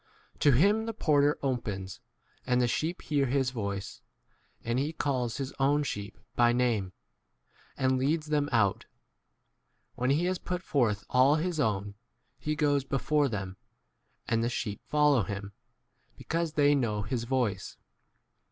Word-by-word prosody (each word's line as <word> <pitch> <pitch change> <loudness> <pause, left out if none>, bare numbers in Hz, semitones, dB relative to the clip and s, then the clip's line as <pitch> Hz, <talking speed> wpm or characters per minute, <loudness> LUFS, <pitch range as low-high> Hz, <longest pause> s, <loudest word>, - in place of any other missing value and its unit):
To 145 - +4
him 205 - +3
the 225 - -4
porter 145 -6 +3
opens; 105 -8 -3 0.5
and 125 0 +3
the 125 - +3
sheep 160 +9 -2
hear 145 -3 +1
his 130 0 +1
voice; 100 -5 -5 0.6
and 120 +2 0
he 145 +4 -1
calls 130 -6 -1
his 135 -1 -4
own 145 +2 +3
sheep 105 -6 -5 0.2
by 120 0 +4
name, 115 -6 +1 0.9
and 130 -1 +2
leads 150 +4 0
them 150 -1 0
4 130 - -2
out. 100 -3 +1 1.1
iWhen 125 +1 +1
he 165 +5 +1
has 185 0 -1
put 180 0 -4
forth 115 - 0
all 130 +3 +5
his 165 +1 -1
own, 105 -5 0 0.5
he 150 +4 -2
goes 145 -2 +2
before 140 +2 +1
them, 95 -4 -5 0.7
and 115 0 +1
the 120 - +1
sheep 105 -4 -4
follow 150 -4 +4
him, 100 +1 -5 0.7
because 165 0 -2
5 150 - -20
they 145 -1 +4
know 110 -7 0
his 115 +2 -3
voice. 120 -7 -1
130 Hz, 150 wpm, -29 LUFS, 115-150 Hz, 1.1 s, all